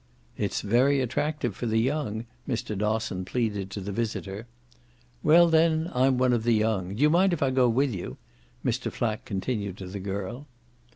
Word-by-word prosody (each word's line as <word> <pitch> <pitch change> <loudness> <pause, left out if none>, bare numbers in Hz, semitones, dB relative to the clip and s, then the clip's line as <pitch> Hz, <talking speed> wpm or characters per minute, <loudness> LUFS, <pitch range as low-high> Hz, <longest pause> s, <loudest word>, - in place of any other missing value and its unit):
"It's - - -2
very 130 +7 +3
attractive 130 -2 -1
for 120 - -3
the 110 0 +1
young," 120 -3 -1 0.2
Mr. 115 -3 -2
Dosson 105 -2 -1
pleaded 105 -2 -2
to 95 - -5
the 100 +1 -5
visitor. 105 -1 -4 0.7
"Well 170 +3 +6
then, 160 0 +3
I'm 130 +1 +3
one 125 0 +3
of 120 - +1
the 115 -1 +3
young. 105 -4 0
Do - - -8
you 150 - +6
mind 185 +2 +4
if 160 - 0
I 135 - +2
go 130 -2 +3
with 130 +2 +1
you?" 90 -3 -6 0.5
Mr. - - -1
Flack 110 -2 -2
continued 100 -1 -3
to 95 - -7
the 95 +2 -6
girl. 100 +8 -5
115 Hz, 180 wpm, -27 LUFS, 100-135 Hz, 0.7 s, Well